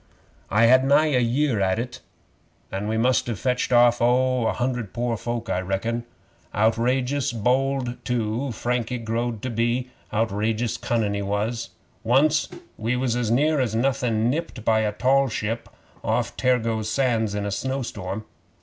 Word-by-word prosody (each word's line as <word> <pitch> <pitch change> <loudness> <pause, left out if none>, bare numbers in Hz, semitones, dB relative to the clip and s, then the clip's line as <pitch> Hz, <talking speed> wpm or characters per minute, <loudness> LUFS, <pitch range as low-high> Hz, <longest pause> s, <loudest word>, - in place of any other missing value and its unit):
'I 110 +3 +4
had 130 +2 +6
nigh 145 +3 +4
a 125 - +4
year 125 0 +1
at 95 0 +2
it, 120 +2 -4 0.7
an' 95 +2 -3
we 110 +1 0
must 125 +3 +2
have 115 -4 -2
fetched 125 +4 -1
off 120 -1 +5
oh, 125 0 +3
a - - +2
hundred 120 -5 -2
pore 120 0 -1
folk, 120 +1 -4
I 90 - 0
reckon. 115 +6 -2 0.5
Outrageous 125 +5 +1
bold, 125 +2 0
too, 120 +2 -1
Frankie 120 +2 -2
growed 115 -1 -3
to 130 - -2
be. 120 +3 0 0.2
Outrageous 110 +1 0
cunnin' 110 -4 0
he 100 - -2
was. 110 +4 -2 0.3
Once 145 +6 +3 0.3
we 115 +3 0
was 125 -2 0
as 120 -3 -1
near 150 +6 +3
as 120 -4 0
nothin' 120 -3 +1
nipped 145 -7 -4
by 110 -1 +4
a 110 -1 +1
tall 135 +5 +2
ship 110 +1 -3 0.3
off 110 0 -1
Tergoes 115 -4 +1
Sands 115 -4 +1
in 105 0 -2
a 100 - -2
snowstorm. 110 -5 -3
120 Hz, 160 wpm, -24 LUFS, 110-130 Hz, 0.7 s, had